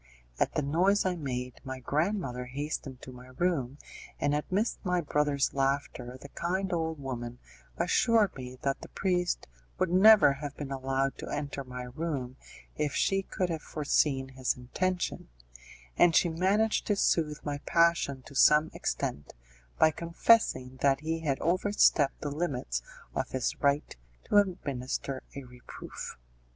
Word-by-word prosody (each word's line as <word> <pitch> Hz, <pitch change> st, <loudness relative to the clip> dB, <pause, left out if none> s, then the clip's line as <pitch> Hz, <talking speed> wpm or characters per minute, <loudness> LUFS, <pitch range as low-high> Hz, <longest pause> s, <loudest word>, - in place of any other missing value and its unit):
At -, -, +1 dB
the 150 Hz, -, +1 dB
noise 180 Hz, +9 st, +2 dB
I 185 Hz, -1 st, +1 dB
made 125 Hz, -5 st, -5 dB
my 130 Hz, -1 st, -6 dB
grandmother 145 Hz, -2 st, -1 dB
hastened 135 Hz, 0 st, -5 dB
to 130 Hz, -, -8 dB
my 125 Hz, 0 st, -12 dB
room, 145 Hz, -7 st, 0 dB, 0.4 s
and 145 Hz, 0 st, +1 dB
amidst 185 Hz, +9 st, -1 dB
my 180 Hz, -2 st, +1 dB
brother's 145 Hz, -3 st, +1 dB
laughter 135 Hz, -2 st, -1 dB
the 140 Hz, -, -11 dB
kind 185 Hz, +5 st, -2 dB
old 160 Hz, -2 st, -1 dB
woman 120 Hz, -3 st, -5 dB, 0.4 s
assured 225 Hz, -4 st, +3 dB
me 130 Hz, -1 st, -8 dB
that 135 Hz, -1 st, -1 dB
the -, -, -10 dB
priest 180 Hz, -2 st, 0 dB, 0.3 s
would 185 Hz, -2 st, 0 dB
never 200 Hz, -4 st, +7 dB
have 140 Hz, 0 st, -7 dB
been 140 Hz, -2 st, -6 dB
allowed 135 Hz, 0 st, -1 dB
to -, -, -6 dB
enter 145 Hz, -1 st, -3 dB
my 125 Hz, -1 st, -7 dB
room 130 Hz, -1 st, -4 dB, 0.4 s
if 150 Hz, -2 st, -1 dB
she 195 Hz, 0 st, +2 dB
could 185 Hz, -2 st, -2 dB
have 160 Hz, -2 st, -3 dB
foreseen 140 Hz, -3 st, 0 dB
his 130 Hz, -1 st, -1 dB
intention, 180 Hz, -, -2 dB, 0.7 s
and 170 Hz, -2 st, +5 dB
she 175 Hz, -, +5 dB
managed 195 Hz, +7 st, +1 dB
to 205 Hz, -, +2 dB
soothe 155 Hz, -6 st, +1 dB
my 145 Hz, -1 st, -2 dB
passion 165 Hz, -6 st, +2 dB
to 140 Hz, -, -13 dB
some 150 Hz, +3 st, +5 dB
extent 70 Hz, 0 st, -3 dB, 0.4 s
by 155 Hz, -, +5 dB
confessing 170 Hz, -, +2 dB
that 140 Hz, 0 st, +3 dB
he 160 Hz, +1 st, -2 dB
had 145 Hz, -4 st, -1 dB
over 185 Hz, +4 st, +1 dB
stepped 145 Hz, -8 st, +3 dB
the 145 Hz, -, -3 dB
limits 135 Hz, -, -2 dB, 0.3 s
of -, -, -2 dB
his 130 Hz, -2 st, -1 dB
right 140 Hz, +1 st, +1 dB, 0.3 s
to 205 Hz, -, +2 dB
administer 140 Hz, -8 st, -1 dB
a 140 Hz, -, -6 dB
reproof. 125 Hz, 0 st, -9 dB
145 Hz, 150 wpm, -29 LUFS, 130-175 Hz, 0.7 s, never